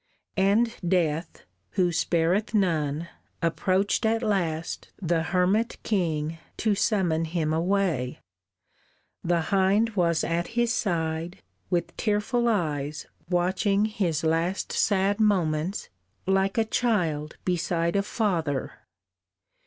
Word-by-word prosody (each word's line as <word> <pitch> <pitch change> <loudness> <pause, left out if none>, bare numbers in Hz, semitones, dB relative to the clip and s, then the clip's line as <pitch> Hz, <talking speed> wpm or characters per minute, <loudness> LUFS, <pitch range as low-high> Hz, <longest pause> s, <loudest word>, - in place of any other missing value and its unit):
And 215 +5 +3
Death, 170 -2 0 0.3
who 180 -3 +2
spareth 175 +6 +1
none, 160 -5 +1 0.3
approached 185 +5 +1
at 225 +1 +1
last 170 -6 -1
The 170 -3 +1
hermit 185 +7 +1
king 165 -5 -1 0.2
to 215 -2 +2
summon 185 -6 +1
him 160 -1 -1
away; 170 -7 0 1.0
The 170 0 +2
hind 200 +4 +3
was 170 -4 +2
at 170 +1 -1
his 240 0 +3
side, 170 -3 -2 0.3
with 175 -2 -1
tearful 225 +3 +1
eyes 150 -8 -1 0.2
Watching 190 +3 +2
his 190 -8 -1
last 165 +4 0
sad 200 0 +2
moments, 180 -4 +1 0.4
like 195 +1 +1
a 225 - +3
child 175 -11 0
Beside 170 -1 0
a 200 - +4
father. 175 - -1
180 Hz, 105 wpm, -26 LUFS, 165-205 Hz, 1.0 s, a